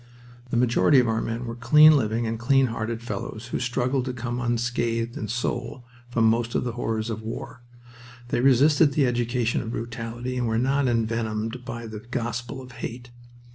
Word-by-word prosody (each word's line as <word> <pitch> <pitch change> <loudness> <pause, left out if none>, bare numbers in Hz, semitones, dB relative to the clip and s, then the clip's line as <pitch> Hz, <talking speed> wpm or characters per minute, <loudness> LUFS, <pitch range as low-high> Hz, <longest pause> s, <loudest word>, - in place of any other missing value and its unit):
The 120 - 0
majority 125 +3 +4
of 125 - +2
our 110 0 0
men 115 +2 -3
were 115 - -4
clean 150 +6 +7
living 115 -2 0
and 115 0 -3
clean 135 +2 +4
hearted 115 +1 -3
fellows 110 +1 -6
who - - -1
struggled 125 +1 0
to 130 - -3
come 120 0 -4
unscathed 120 -1 -1
in 110 - -4
soul 120 +2 -3 0.2
from 115 -2 +2
most 115 +1 +1
of - - +1
the 125 - -2
horrors 115 -1 -2
of 110 0 -4
war. 115 +3 -7 0.7
They 120 - +1
resisted 140 +3 +5
the 140 -1 +3
education 120 -1 0
of 115 - -6
brutality 115 +2 -5
and 120 -1 0
were 110 0 0
not 135 +3 +2
envenomed 115 0 -1
by 115 -1 -6
the 110 -1 -7
gospel 120 +2 -4
of 125 - -12
hate. 120 0 -7
120 Hz, 180 wpm, -25 LUFS, 115-125 Hz, 0.7 s, clean